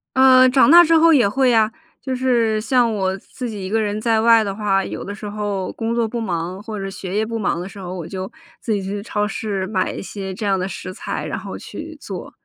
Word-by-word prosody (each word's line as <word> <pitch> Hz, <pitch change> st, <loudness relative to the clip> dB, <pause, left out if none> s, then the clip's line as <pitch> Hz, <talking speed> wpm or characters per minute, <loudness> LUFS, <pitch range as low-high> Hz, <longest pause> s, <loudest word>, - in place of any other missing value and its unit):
呃， 260 Hz, 0 st, +7 dB
长 270 Hz, +2 st, +5 dB
大 345 Hz, +3 st, +9 dB
之 330 Hz, 0 st, +3 dB
后 330 Hz, +1 st, +6 dB
也 260 Hz, -9 st, +5 dB
会 260 Hz, +5 st, +2 dB
呀， 220 Hz, -2 st, +3 dB, 0.3 s
就 260 Hz, -1 st, -3 dB
是 235 Hz, -4 st, +1 dB
像 240 Hz, +1 st, +2 dB
我 190 Hz, -2 st, -1 dB
自 245 Hz, +4 st, -7 dB
己 205 Hz, -3 st, -6 dB
一 -, -, -5 dB
个 220 Hz, +2 st, +1 dB
人 210 Hz, 0 st, -2 dB
在 225 Hz, -1 st, +2 dB
外 230 Hz, -1 st, +6 dB
的 200 Hz, -, -3 dB
话， 195 Hz, -2 st, +1 dB
有 -, -, -6 dB
的 200 Hz, -, -6 dB
时 210 Hz, -, -8 dB
候 205 Hz, -2 st, -3 dB
工 230 Hz, +1 st, -2 dB
作 235 Hz, -1 st, +1 dB
不 235 Hz, +1 st, -4 dB
忙， 180 Hz, -2 st, -3 dB
或 215 Hz, -1 st, -6 dB
者 195 Hz, -, -4 dB
学 190 Hz, 0 st, -6 dB
业 215 Hz, +1 st, +1 dB
不 230 Hz, 0 st, -4 dB
忙 185 Hz, -4 st, 0 dB
的 180 Hz, -, -5 dB
时 200 Hz, +1 st, -11 dB
候。 180 Hz, -1 st, -6 dB
我 170 Hz, -3 st, -6 dB
就 190 Hz, 0 st, -6 dB, 0.3 s
自 230 Hz, -, -3 dB
己 200 Hz, -2 st, -1 dB
去 200 Hz, +2 st, -4 dB
超 210 Hz, -1 st, -1 dB
市 205 Hz, -3 st, -3 dB
买 190 Hz, -2 st, -1 dB
一 -, -, -6 dB
些 195 Hz, -1 st, -6 dB
这 205 Hz, +3 st, -5 dB
样 195 Hz, -1 st, +2 dB
的 185 Hz, -, -2 dB
食 185 Hz, -1 st, -7 dB
材， -, -, -5 dB
然 -, -, -4 dB
后 -, -, -7 dB
去 -, -, -9 dB
做， -, -, -7 dB
210 Hz, 275 characters per minute, -20 LUFS, 195-235 Hz, 0.3 s, 大